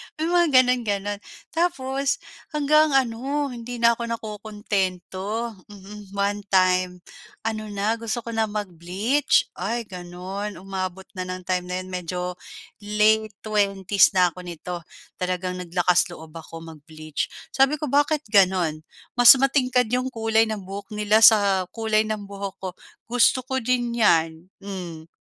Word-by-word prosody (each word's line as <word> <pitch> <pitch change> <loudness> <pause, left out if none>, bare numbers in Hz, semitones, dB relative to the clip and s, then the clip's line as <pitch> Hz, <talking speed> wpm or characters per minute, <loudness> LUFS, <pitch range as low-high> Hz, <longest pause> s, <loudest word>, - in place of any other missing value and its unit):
May 320 +1 -2
mga 345 -1 +4 0.2
gano'n-gano'n. 205 -5 -1 0.3
Tapos 275 -5 -1 0.3
hanggang 300 0 +4
ano, 270 +3 0
hindi 240 0 -7
na 235 - +7
ako 235 - -3
nakokontento. 210 0 -3
Mhm. 200 0 -12
1 200 +1 0
time 185 -1 +2 0.4
ano 215 -1 -3
na, 210 +3 -1
gusto 230 +1 -3
ko 230 - -6
na 225 -1 0
mag-bleach. 205 - 0
Ay, 230 +5 -2
gano'n, 185 +2 -6
umabot 190 0 -5 0.2
na 185 - -3
ng 185 0 -6
time 180 0 -1
na 180 - -3
'yon, 185 - -11
medyo 180 0 -4 0.4
late 215 0 +2
'20s 200 -2 +2
na 180 -2 +4
ako 180 - -13
nito, 175 +1 -6 0.4
talagang 180 0 -2
naglakas-loob 175 -2 0
ako 165 0 -10
mag-bleach. 155 -1 -6 0.2
Sabi 270 +2 +3
ko, 300 -3 -4
"Bakit 290 +1 +2
gano'n? 185 -6 +3 0.4
Mas 245 +2 +10
matingkad 255 -3 +2
yung 255 +1 +1
kulay 225 -2 +1
ng 215 -3 -4
buhok 200 +2 -8
nila 210 +1 +3
sa 200 -5 +6
kulay 220 -1 +1
ng 215 -1 -3
buhok 200 -1 -6
ko. 185 - -2 0.3
Gusto 245 +2 +3
ko 265 0 -2
din 245 0 0
'yan." 165 -4 +2 0.2
Hmm. 175 -5 -7
205 Hz, 140 wpm, -24 LUFS, 185-235 Hz, 0.4 s, Mas